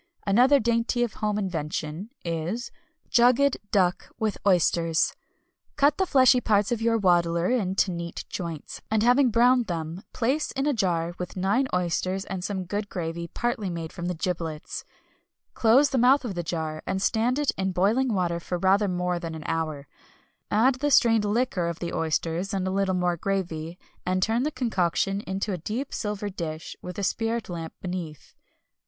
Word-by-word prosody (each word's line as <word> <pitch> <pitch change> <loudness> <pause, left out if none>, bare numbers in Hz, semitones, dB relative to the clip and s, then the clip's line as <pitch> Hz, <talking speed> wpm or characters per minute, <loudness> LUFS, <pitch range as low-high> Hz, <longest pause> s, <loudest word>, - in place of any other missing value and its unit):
Another 250 +8 +5
dainty 235 +1 +1
of 235 - -2
home 210 -1 -1
invention 165 -1 -3 0.2
is 170 +9 -3 0.4
Jugged 250 +3 +4
Duck 185 -3 +1
with 220 -3 -1
Oysters. 170 -3 +3 0.6
Cut 285 0 +3
the 380 - +2
fleshy 255 -4 +5
parts 205 -2 +2
of 235 -2 -1
your 230 0 +2
waddler 175 -2 +2
into 195 -5 +1
neat 170 -1 -5
joints, 165 -4 -6
and 215 0 +2
having 250 +2 +5
browned 245 +1 +4
them 165 +1 -4
place 265 +6 0
in 270 0 -1
a 295 - +2
jar 175 -6 0
with 180 +1 -6
nine 200 +9 +2
oysters 180 +2 -1
and 190 -2 -5
some 190 -1 -2
good 205 +3 -4
gravy 170 -1 -4
partly 240 +1 -2
made 165 -2 -5
from 175 -1 -5
the 180 - -2
giblets. 165 -3 -4 0.7
Close 255 +5 +4
the 265 - +2
mouth 255 +3 +5
of 215 - -3
the 175 - -2
jar, 160 -2 -3
and 190 - -1
stand 225 +6 +1
it 295 -1 +2
in 190 0 -1
boiling 220 +8 +2
water 175 -4 0
for 180 +1 -3
rather 195 +3 +3
more 180 -1 -1
than 165 -2 -5
an 155 - -7
hour. 155 -4 -2 0.6
Add 250 +5 +3
the 290 +2 +1
strained 225 -5 +4
liquor 210 -5 0
of 170 -1 -3
the 170 -1 -5
oysters 165 +4 -1
and 190 -1 -1
a - - -1
little 190 -1 +1
more 180 -1 +1
gravy, 170 -3 -3 0.3
and 185 0 0
turn 225 +3 +1
the 295 - +1
concoction 195 - 0
into 195 +2 -2
a 180 - -3
deep 230 - -4
silver 210 -1 -3
dish 165 -3 -5
with 180 0 -7
a 200 - -3
spirit 225 +2 -1
lamp 165 -2 -6
beneath. 175 -5 -6
190 Hz, 175 wpm, -26 LUFS, 170-230 Hz, 0.7 s, Another